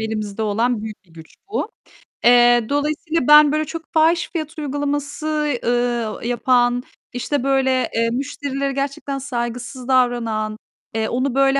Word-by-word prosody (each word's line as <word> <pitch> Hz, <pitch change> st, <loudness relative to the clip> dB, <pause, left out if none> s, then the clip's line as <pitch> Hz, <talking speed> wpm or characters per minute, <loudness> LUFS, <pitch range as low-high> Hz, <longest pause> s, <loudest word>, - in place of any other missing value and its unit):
elimizde 220 Hz, -1 st, -3 dB
olan 225 Hz, +2 st, 0 dB
büyük 215 Hz, -2 st, -8 dB
bir 170 Hz, -, -25 dB
güç 160 Hz, -1 st, -14 dB
bu. 435 Hz, +2 st, -2 dB, 0.6 s
Eee, 240 Hz, -1 st, +6 dB
dolayısıyla 305 Hz, +1 st, -1 dB
ben 300 Hz, -1 st, +8 dB
böyle 310 Hz, +1 st, 0 dB
çok 330 Hz, +2 st, -6 dB
fahiş 330 Hz, +2 st, +3 dB
fiyat 315 Hz, -2 st, -4 dB
uygulaması, 290 Hz, +1 st, -2 dB
ııı, 240 Hz, -2 st, -1 dB
yapan, 245 Hz, 0 st, +2 dB, 0.3 s
işte 250 Hz, +2 st, -2 dB
böyle, 265 Hz, -1 st, +1 dB
eee, 230 Hz, 0 st, +2 dB
müşterilere 275 Hz, +2 st, -3 dB
gerçekten 275 Hz, 0 st, -3 dB
saygısız 245 Hz, 0 st, -5 dB
davranan, 235 Hz, -4 st, +1 dB, 0.4 s
eee, 220 Hz, 0 st, 0 dB
onu 255 Hz, +1 st, -1 dB
böyle 275 Hz, 0 st, +4 dB
255 Hz, 135 wpm, -20 LUFS, 240-290 Hz, 0.6 s, ben